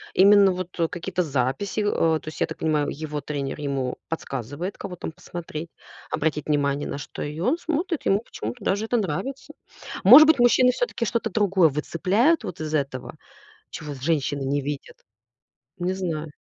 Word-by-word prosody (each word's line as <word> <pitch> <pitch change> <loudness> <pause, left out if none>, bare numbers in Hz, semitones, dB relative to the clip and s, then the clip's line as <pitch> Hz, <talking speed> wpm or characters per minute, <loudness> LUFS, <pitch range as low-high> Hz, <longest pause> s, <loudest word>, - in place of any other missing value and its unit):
Именно 200 0 +7
вот, 180 -1 -6
э, 165 - +3
какие-то 180 +2 -3
записи. 140 - -1
Э, 165 -6 +2
то - - -25
есть, 155 - -7
я - - +3
так - - -7
понимаю, 150 -2 +1
его 150 0 -5
тренер 140 -1 -4
ему 135 -3 -2
подсказывает, 145 - -4
кого 180 - -6
там 165 - -6
посмотреть, 165 -1 -7 0.4
обратить 150 -1 -1
внимание 145 -1 0
на - - -4
что, 145 - -8
и 150 +2 -5
он 250 - +1
смотрит. 335 0 -2
Ему 195 - +3
почему-то 115 - -7
даже 205 +3 0
это 240 +2 +1
нравится. 260 - -3 0.5
Может 265 +10 +10
быть, 315 -4 +5
мужчины 245 +1 +5
всё-таки 255 - -2
что-то 230 0 -1
другое 190 -5 +3
выцепляют 195 - +1
вот 170 - -6
из 155 0 -4
этого, 135 -4 -2 0.6
чего 150 -1 -6
женщины 145 0 -1
не 140 +2 0
видят? 140 0 -6 0.8
Не 180 +1 -1
знаю. 160 -5 -3
165 Hz, 170 wpm, -24 LUFS, 145-205 Hz, 0.8 s, Может